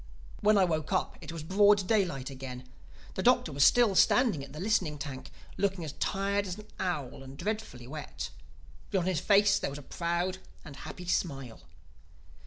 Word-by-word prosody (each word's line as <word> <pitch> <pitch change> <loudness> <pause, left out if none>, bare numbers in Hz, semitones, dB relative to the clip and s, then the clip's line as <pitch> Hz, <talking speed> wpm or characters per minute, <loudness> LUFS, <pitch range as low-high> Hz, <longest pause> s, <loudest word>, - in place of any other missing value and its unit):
When 210 0 +4
I 195 - +6
woke 155 -2 -2
up 185 - 0
it - - -7
was 165 -2 -6
broad 200 +2 +4
daylight 175 - +1
again. 130 -1 -8 0.5
The - - -2
Doctor 240 -7 +3
was 140 0 +2
still 235 +1 +6
standing 205 - +4
at 135 - -10
the 150 - -8
listening 185 -6 +1
tank, 140 -2 -7 0.3
looking 195 -3 0
as 150 - -5
tired 200 +1 0
as 180 - -4
an 210 - -10
owl 150 -9 -3
and 135 0 -10
dreadfully 210 - -4
wet. 150 +3 -6 0.6
But - - 0
on 180 - 0
his 185 -4 +1
face 205 +2 +4
there - - -2
was 140 - -6
a 145 - -9
proud 175 +5 -2 0.3
and 145 -3 -9
happy 180 - -8
smile. 135 -9 -2
175 Hz, 185 wpm, -30 LUFS, 140-200 Hz, 0.6 s, I